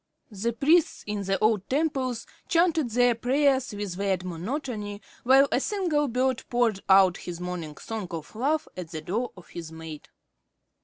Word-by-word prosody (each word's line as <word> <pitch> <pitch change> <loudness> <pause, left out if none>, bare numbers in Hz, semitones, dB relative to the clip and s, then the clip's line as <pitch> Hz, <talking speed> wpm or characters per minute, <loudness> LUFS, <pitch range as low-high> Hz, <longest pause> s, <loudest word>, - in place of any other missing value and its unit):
The 215 +3 -1
priests 310 +8 +3
in 205 -1 -3
the 195 +1 +1
old 215 -3 +1
temples 265 -5 0 0.2
chanted 330 -6 +2
their 245 +1 +4
prayers 265 +2 +2
with 205 -3 -5
weird 195 -2 0
monotony, 205 - -4 0.2
while 270 +3 +6
a - - +3
single 325 -5 0
bird 255 0 0
poured 240 -5 +2
out 190 -2 +6
his 175 -1 -7
morning 175 -4 -5
song 220 -4 -5
of 165 +2 -7
love 295 +7 0
at 180 -3 -6
the 160 -2 -5
door 220 +10 -2
of 180 - -14
his 165 -2 -7
mate. 160 -2 -9
225 Hz, 160 wpm, -27 LUFS, 185-265 Hz, 0.2 s, while